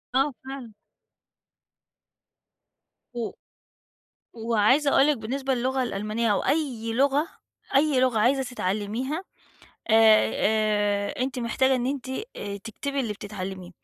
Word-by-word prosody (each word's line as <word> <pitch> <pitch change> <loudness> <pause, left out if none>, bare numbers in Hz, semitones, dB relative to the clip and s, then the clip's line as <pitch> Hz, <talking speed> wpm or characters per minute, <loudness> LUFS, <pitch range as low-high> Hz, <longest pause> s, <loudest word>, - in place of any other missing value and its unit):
آه، 270 +2 +2
فعلًا. 265 -4 -8 2.4
و 235 -2 -3 1.0
وعايزة 235 +5 +2
أقول 275 - +5
لِك 300 -1 +3
بالنسبة 265 +4 -2
للغة 260 +2 0
الألمانية 215 0 -1
أو 200 - +1
أي 255 -7 -1
لغة 280 +6 +2 0.5
أي 280 -1 +4
لغة 255 -3 +2
عايزة 260 +5 +3
تتعلّميها 245 - -3 0.7
آآ، 220 -1 +6
آآ 210 0 +1
أنتِ 260 -1 -2
محتاجة 260 +2 +2
إن 245 0 -1
أنتِ، 270 -1 -3 0.3
آآ 200 0 -5
تكتبي 255 +7 -4
اللي 230 -5 -2
بتتعلّميه. 190 -3 -7
240 Hz, 115 wpm, -26 LUFS, 215-270 Hz, 2.4 s, آآ